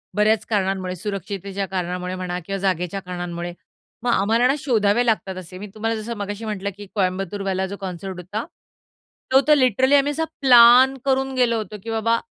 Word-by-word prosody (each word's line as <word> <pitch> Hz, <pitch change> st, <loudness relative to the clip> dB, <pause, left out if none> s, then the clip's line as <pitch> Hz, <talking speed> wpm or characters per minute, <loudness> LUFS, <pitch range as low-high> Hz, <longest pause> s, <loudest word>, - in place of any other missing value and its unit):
बऱ्याच 215 Hz, +1 st, +2 dB
कारणांमुळे, 190 Hz, -3 st, -1 dB
सुरक्षिततेच्या 195 Hz, 0 st, -4 dB
कारणामुळे 180 Hz, 0 st, -3 dB
म्हणा 180 Hz, -1 st, -4 dB
किंवा 195 Hz, 0 st, -3 dB
जागेच्या 185 Hz, 0 st, -1 dB
कारणांमुळे. 175 Hz, -1 st, -5 dB, 0.5 s
मग 245 Hz, -, +1 dB
आम्हाला 230 Hz, +4 st, +3 dB
ना 270 Hz, -, +3 dB
शोधावे 235 Hz, -3 st, +2 dB
लागतात 205 Hz, -4 st, 0 dB
असे. 185 Hz, 0 st, -9 dB
मी 205 Hz, +2 st, -7 dB
तुम्हाला 225 Hz, +1 st, -1 dB
जसं 230 Hz, +2 st, -5 dB
मगाशी 205 Hz, +2 st, -5 dB
म्हटलं, 200 Hz, -2 st, -3 dB
की 205 Hz, -, -9 dB
कोयंबतूरवाला 190 Hz, 0 st, -1 dB
जो 200 Hz, +1 st, -7 dB
कॉन्सर्ट 185 Hz, 0 st, -6 dB
होता, 205 Hz, +6 st, -5 dB, 0.9 s
तो 265 Hz, +1 st, +6 dB
तर 300 Hz, -, +7 dB
लिटरली 260 Hz, +1 st, +3 dB
आम्ही 285 Hz, +1 st, +3 dB
असा 320 Hz, +2 st, -2 dB, 0.2 s
प्लॅन 250 Hz, +1 st, +7 dB
करून 265 Hz, 0 st, +1 dB
गेलो 240 Hz, -2 st, +2 dB
होतो, 215 Hz, -1 st, -5 dB
की 230 Hz, -, -7 dB
बाबा 225 Hz, +1 st, +1 dB
205 Hz, 170 wpm, -22 LUFS, 185-235 Hz, 0.9 s, तर